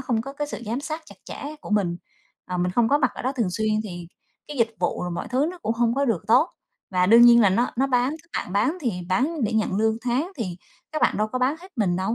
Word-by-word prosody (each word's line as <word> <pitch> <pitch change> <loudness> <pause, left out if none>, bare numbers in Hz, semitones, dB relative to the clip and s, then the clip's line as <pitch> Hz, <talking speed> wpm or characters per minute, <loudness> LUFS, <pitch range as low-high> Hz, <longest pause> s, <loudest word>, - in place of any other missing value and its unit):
không 240 -4 0
có 275 +2 -7
cái 295 +1 -3
sự 260 - -7
giám 235 +5 -2
sát 310 +2 -5
chặt - - -13
chẽ 300 +2 -7
của - - -10
mình, 185 -5 +1 0.6
mình 180 +1 +1
không 230 +1 +3
có 285 - +4
mặt 255 - +2
ở - - -7
đó 260 - 0
thường 230 -9 -1
xuyên 215 +4 -1 0.2
thì 175 -3 -7 0.4
cái 295 - -6
dịch 230 -1 +2
vụ 175 - -1
rồi 180 - -3
mọi 170 - -4
thứ 265 +5 +1
nó 365 - -10
cũng 225 - 0
không 230 0 +1
có 280 +1 +1
được 210 -7 0
tốt. 255 +9 +5 0.4
Và 180 -1 +2
đương 230 +4 +8
nhiên 235 0 +8
là 205 - +5
nó 235 +6 +1
nó 270 - +2
bán 255 +2 +1
các 340 - -29 0.2
bạn - - -10
bán 250 - +1
thì 240 -8 0 0.2
bán 270 - +1
để 220 - -1
nhận 215 -3 0
lương 220 +1 +2
tháng 270 +10 0
thì 185 -8 -4 0.4
các 310 - -2
bạn - - +3
đâu 215 +1 +1
có 255 - -3
bán 260 +4 +2
hết 370 - -12
mình 185 -5 +1
đâu, 190 +5 -1
235 Hz, 275 wpm, -24 LUFS, 205-275 Hz, 0.6 s, đương